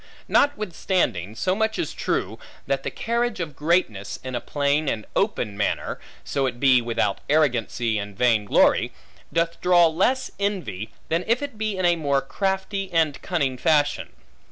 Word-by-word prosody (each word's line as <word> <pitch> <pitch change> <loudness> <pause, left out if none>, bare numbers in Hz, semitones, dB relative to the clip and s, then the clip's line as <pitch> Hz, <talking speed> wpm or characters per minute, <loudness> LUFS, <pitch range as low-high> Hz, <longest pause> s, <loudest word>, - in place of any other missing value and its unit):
Notwithstanding, 180 - +1
so 185 +10 0
much 220 +2 0
is 345 - -2
true, - - -2 0.3
that - - 0
the - - -3
carriage 235 0 -1
of 155 -5 -4
greatness, 150 - 0
in 130 0 -5
a 120 - -2
plain 145 +1 0
and 110 -2 -3
open 125 - 0
manner 105 0 -2 0.2
(so 135 -2 0
it 120 -1 -5
be 130 -2 +5
without 115 -4 -1
arrogancy 120 -6 +1
and 100 -1 -7
vain 115 -4 +3
glory) - - +3 0.4
doth 165 0 -1
draw 175 -1 +6
less 195 +11 +1
envy, 185 - -2 0.2
than 165 +2 +1
if 235 +5 +2
it 280 -5 -5
be 215 -2 -2
in 185 - 0
a 175 -1 +4
more 140 -3 +1
crafty 195 +4 -2
and 155 -5 +1
cunning 140 -8 -1
fashion. 150 -2 +1
155 Hz, 160 wpm, -24 LUFS, 125-190 Hz, 0.4 s, draw